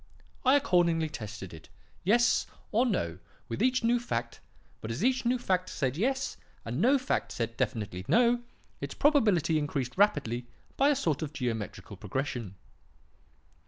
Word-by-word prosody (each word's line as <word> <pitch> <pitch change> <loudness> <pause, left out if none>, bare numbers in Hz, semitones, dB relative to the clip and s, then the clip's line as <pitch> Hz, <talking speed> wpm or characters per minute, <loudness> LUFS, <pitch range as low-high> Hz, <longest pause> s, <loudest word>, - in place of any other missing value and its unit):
I 265 +1 +6
accordingly 170 - +3
tested 105 - -7
it, 80 -1 -12 0.3
'Yes?' 235 +6 +3 0.2
or 240 +4 +3
'No?' 85 - -1 0.3
with 115 -3 -4
each 255 -1 +2
new 240 +1 +3
fact; 115 - -3 0.4
but 110 - -6
as 120 - -3
each 255 0 +2
new 250 +2 +3
fact 185 -6 0
said 130 -3 -1
'Yes,' 265 - -1 0.3
and 120 +7 -2
no 265 +6 +5
fact 260 0 -1
said 115 -1 -3
definitely 105 -7 -2
'No,' 240 0 +4 0.4
its - - -5
probability 205 - +3
increased 140 -4 -2
rapidly 125 - +2 0.3
by 275 +2 +4
a 295 - +4
sort 165 - 0
of 155 -1 -4
geometrical 110 -7 -4
progression. 110 0 -4
160 Hz, 150 wpm, -29 LUFS, -, 0.4 s, I